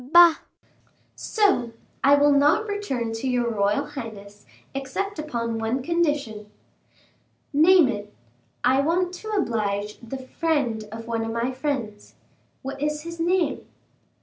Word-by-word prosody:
"Bah!" 335 +4 +7 0.8
"So, 385 - +1 0.3
I 280 +1 +7
will 290 0 +4
not 290 +9 +4
return 275 - -3
to 225 +4 -3
your 245 -2 +1
royal 205 +6 +1
highness, 220 -8 -9 0.3
except 290 +8 -4
upon 230 -7 -3
one 230 +4 -1
condition." 290 -11 -1 1.0
"Name 330 +2 +6
it." 210 -4 -4 0.5
"I 260 +2 +4
want 350 +4 +1
to 435 - -9
oblige 210 - -1
the 235 +3 -7
friend 260 -5 -1
of 225 +1 -7
one 230 -1 -2
of 225 - -3
my 235 +3 -1
friends." 255 -6 -4 0.5
"What's 295 +3 -3
his 335 +1 -8
name?" 350 +1 0
270 Hz, 125 wpm, -24 LUFS, 225-320 Hz, 1.0 s, Bah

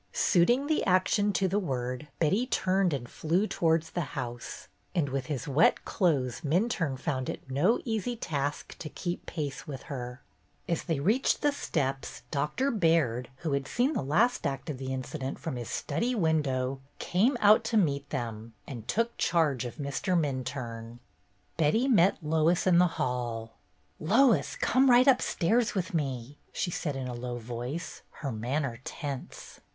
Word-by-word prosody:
Suiting 240 +10 +3
the 310 +1 +1
action 190 +2 +3
to 195 - +2
the 195 +3 +1
word, 130 -4 -3
Betty 195 +10 +2
turned 190 -5 +2
and 130 -4 -3
flew 170 - 0
towards 165 -4 +1
the 170 -6 -4
house, 120 -1 -5 0.3
and 155 -6 +1
with 135 -1 -3
his 145 -3 -3
wet 145 +4 +3
clothes 145 - +1
Minturne 165 - 0
found 130 -2 -2
it - - -6
no 175 - +3
easy 225 0 -1
task 145 -9 -3
to 155 - -6
keep 175 +3 -5
pace 145 -3 -4
with 135 -3 -6
her. 125 -2 -6 0.5
As 170 -2 0
they 160 -5 0
reached 215 - +2
the 295 - +4
steps. 135 - -3
Doctor 155 - 0
Baird, 160 - +2 0.2
who 155 - +1
had 140 -1 -1
seen 255 +5 +1
the 250 - -1
last 175 - +2
act 140 +3 -4
of 130 - -7
the 130 0 -4
incident 130 +1 -4
from 160 - -4
his 120 -2 -5
study 245 +2 -1
window, 135 - 0 0.2
came 230 +9 +2
out 210 +1 +6
to 225 - +1
meet 140 -7 +1
them 115 -4 -4
and 120 -5 -8
took 230 +2 0
charge 145 -8 +2
of 120 - -6
Mr. 150 +5 0
Minturne. 130 -5 -4 0.6
Betty 170 - +3
met 200 -8 +4
Lois 160 +3 +2
in 175 -2 +5
the 180 - +6
hall. 120 -3 -2 0.5
"Lois, 215 - +3
come 265 +1 +3
right 245 +1 +7
upstairs 235 -4 +3
with 185 -2 -2
me," 135 -3 -3
she 175 - -2
said 150 -4 -2
in 130 -1 -4
a 125 - -4
low 120 0 -4
voice, 120 +7 -5
her 140 -4 -4
manner 120 +2 -2
tense. 140 -4 -7
150 Hz, 165 wpm, -29 LUFS, 130-185 Hz, 0.6 s, right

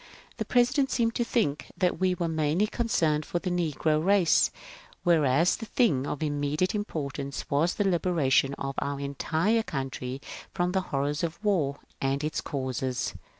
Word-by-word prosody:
The - - -2
President 260 +3 +3
seemed 230 -3 +1
to 240 - 0
think 215 - 0
that 180 -2 +1
we 185 -1 +2
were 175 -2 -1
mainly 160 +4 +1
concerned 165 -10 +1
for 175 - -3
the 180 +1 -2
negro 155 -2 +1
race, 195 -2 +4 0.5
whereas 165 -1 +4
the 225 - -7
thing 150 - +2
of 150 - -3
immediate 145 +4 0
importance 140 -9 -4
was 155 +5 +2
the 205 - +1
liberation 160 -7 +2
of 135 0 -4
our 140 0 -3
entire 160 +10 0
country 135 - -4 0.4
from 175 -1 +1
the 190 0 +1
horrors 145 +2 -1
of 165 -1 -2
war 155 -9 +1 0.2
and 135 +2 0
its 155 - -1
causes. 130 -2 -2
160 Hz, 155 wpm, -28 LUFS, 140-185 Hz, 0.5 s, race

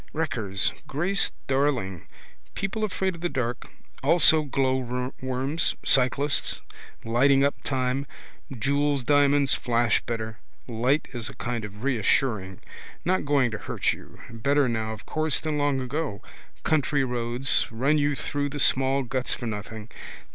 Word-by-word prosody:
Wreckers. 115 -11 0 0.2
Grace 180 +8 +1
Darling. 130 - -1 0.5
People 195 +3 -3
afraid 190 -2 -1
of 170 - -11
the 175 - 0
dark. 125 -4 -3 0.3
Also 155 +2 +5
glowworms, 130 +1 -1
cyclists: 140 +2 +2 0.5
lightingup 135 +4 +3
time. 130 +1 -1 0.5
Jewels 140 +2 +1
diamonds 145 0 +4
flash 120 -2 +1
better. 110 -3 -4 0.3
Women. 115 -2 -7
Light 140 +5 +2
is 115 -3 -4
a - - -11
kind 120 -2 -3
of 105 +1 -9
reassuring. 110 -6 0 0.4
Not 185 -1 +1
going 140 -4 +2
to 110 - -5
hurt - - -1
you. - - -13
Better 140 +4 +1
now 110 -2 -2
of 110 0 -9
course 155 0 +1
than 155 -2 -2
long 145 -2 +1
ago. 130 -4 -3 0.4
Country 145 -2 +1
roads. 120 +1 +2
Run 135 +7 +2
you 145 0 +1
through 145 +1 -2
the 145 - -6
small 135 +1 +3
guts 130 +1 -2
for 120 - -7
nothing. 110 0 -6
135 Hz, 135 wpm, -26 LUFS, 120-145 Hz, 0.5 s, Also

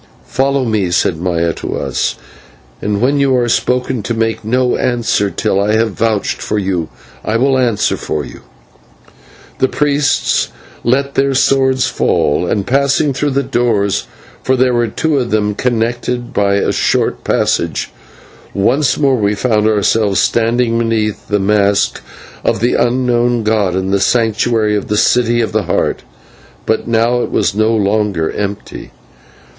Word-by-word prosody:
"Follow 135 0 0
me," 105 -5 0
said 85 -1 +1
Maya 85 -1 -1
to - - -5
us, - - -2 0.7
"and 100 0 -1
when 140 +3 +2
you 135 -2 +2
are 120 -1 +1
spoken 125 +1 0
to 115 +3 -3
make 115 0 -1
no 125 +3 +1
answer 115 -4 0
till 95 0 0
I 105 +1 +1
have 110 0 +1
vouched 110 +1 -1
for 105 - -2
you. 95 -5 -2 0.3
I 110 - 0
will 135 +3 +2
answer 120 -5 +1
for 75 -2 -3
you." - - -11 1.2
The 130 - +3
priests 145 -1 +1 0.4
let 140 +3 +1
their 135 0 +1
swords 130 -1 +2
fall, 75 +5 0
and, 100 +2 -1
passing 140 +2 +1
through 145 +3 -1
the 140 0 0
doors 120 -6 0 0.3
for 130 - +1
there 130 0 +2
were 120 -1 +1
two 150 +6 0
of 125 -2 -2
them 105 -1 0
connected 120 +1 -2
by 100 -1 +2
a 100 - +1
short - - 0
passage - - 0 0.6
once 125 +8 +2
more 135 -3 +2
we 105 -1 0
found 110 -1 +1
ourselves 105 -2 +2
standing 115 +2 +1
beneath 110 -2 -1
the 105 - +1
mask 100 0 +1 0.4
of - - 0
the 120 +3 +1
Unknown 120 -1 +1
god 105 -4 +1
in 95 0 -1
the 100 - +2
Sanctuary 110 -1 +1
of 105 - -3
the 105 - -1
City 120 +1 +2
of 115 - -2
the 105 -2 -1
Heart. 85 - -1 0.6
But 110 - -1
now 115 +1 +2
it - - -3
was - - 0
no 110 +2 +1
longer 100 -5 0
empty. 100 -1 -5
115 Hz, 155 wpm, -15 LUFS, 105-125 Hz, 1.2 s, The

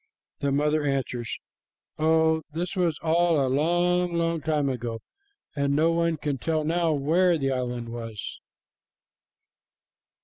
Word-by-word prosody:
the 140 -1 0
mother 150 +2 +1
answers, 130 -4 -2 0.6
"Oh, 160 0 +3
this 175 +4 -3
was 175 -4 +1
all 165 0 +3
a 135 - +2
long, 175 +5 +1
long 165 -1 0
time 150 -2 0
ago, 120 -3 -3 0.6
and 140 -1 +1
no 160 +3 +3
one 170 -1 +1
can 145 -2 -3
tell 155 +3 0
now 165 +1 +1
where 165 +5 +2
the 135 -2 0
island 125 -2 -3
was." 115 -3 -6
155 Hz, 130 wpm, -26 LUFS, 135-165 Hz, 0.6 s, Oh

